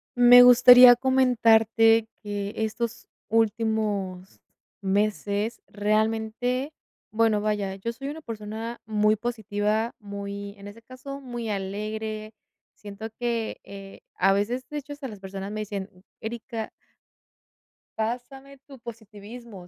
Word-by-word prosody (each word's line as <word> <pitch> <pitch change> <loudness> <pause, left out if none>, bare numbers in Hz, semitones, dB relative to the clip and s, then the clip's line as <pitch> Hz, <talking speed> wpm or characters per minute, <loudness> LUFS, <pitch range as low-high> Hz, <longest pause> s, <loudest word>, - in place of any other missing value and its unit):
Me 245 0 +8
gustaría 245 0 +9
comentarte 225 -3 +3 0.2
que 205 0 -4
estos 225 +1 -3 0.2
últimos 215 -4 -1 0.4
meses 205 +2 -1
realmente 220 +6 -1 0.4
bueno, 220 -1 +2
vaya, 205 -2 -1
yo 230 +5 -5
soy 275 +4 -7
una 310 +2 -7
persona 225 -1 -7
muy 215 0 +2
positiva, 220 0 -2
muy 200 0 -7
en 200 - -10
ese 210 +3 -12
caso, 275 +3 -9
muy 240 -3 -6
alegre. 215 +2 -4 0.4
Siento 205 +1 -8
que, 235 -2 -2
eh, 195 -1 -11
a 195 +1 +3
veces 235 +6 -2
de 300 - -5
hecho, 290 0 -8
hasta 285 -2 -7
las 210 -4 -10
personas 195 +1 -7
me 215 0 -4
dicen: 200 -2 -5 0.3
"Erika" 225 0 -6 1.3
"pásame 265 +5 -5
tu 275 -2 -12
positivismo", 220 -3 -11
220 Hz, 115 wpm, -25 LUFS, 205-240 Hz, 1.3 s, gustaría